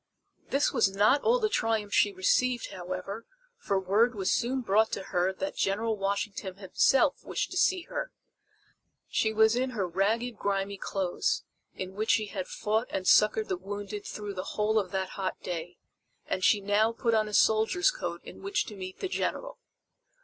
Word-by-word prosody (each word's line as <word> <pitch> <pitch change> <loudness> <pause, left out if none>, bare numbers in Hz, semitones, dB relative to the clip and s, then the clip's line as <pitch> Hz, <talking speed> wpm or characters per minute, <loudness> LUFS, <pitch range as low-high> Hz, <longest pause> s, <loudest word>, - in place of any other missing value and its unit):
This 280 +1 +2
was 230 -6 +3
not 210 +8 +3
all 475 +2 +3
the 440 -3 +1
triumph 225 - -1
she 205 - +4
received, 240 +6 +1
however, 185 +4 -6 0.3
for 200 - 0
word 215 +6 +2
was 195 -2 0
soon 255 +3 0
brought 220 0 +2
to 195 - -2
her 180 +1 +2
that 290 +8 -4
General 220 +3 0
Washington 195 -1 -3
himself 260 - +2
wished - - -3
to 370 - -4
see 370 -1 +3
her. - - -5 1.0
She 220 - +1
was 220 +1 +4
in 260 +1 0
her 190 -3 0
ragged 215 +6 0
grimy 200 0 -1
clothes 195 - -1 0.3
in 185 0 -6
which 215 +3 -3
she 215 - +3
had 195 -3 -5
fought 220 +3 -1
and 185 -1 -3
succored 215 +1 +5
the 185 - -1
wounded 205 +2 -6
through 210 -1 -5
the 185 0 -6
whole 215 +1 +3
of 195 -3 -3
that 190 0 -2
hot 190 -1 -4
day, 175 0 -5 0.5
and 185 - -2
she 205 +1 +4
now 205 +3 +2
put 230 0 0
on 215 -1 +2
a 210 - -8
soldier's 220 - +4
coat - - -5
in - - -11
which 390 +1 -1
to 210 - -9
meet 185 -1 -8
the 385 - -1
General. - - -3
210 Hz, 180 wpm, -29 LUFS, 195-235 Hz, 1.0 s, succored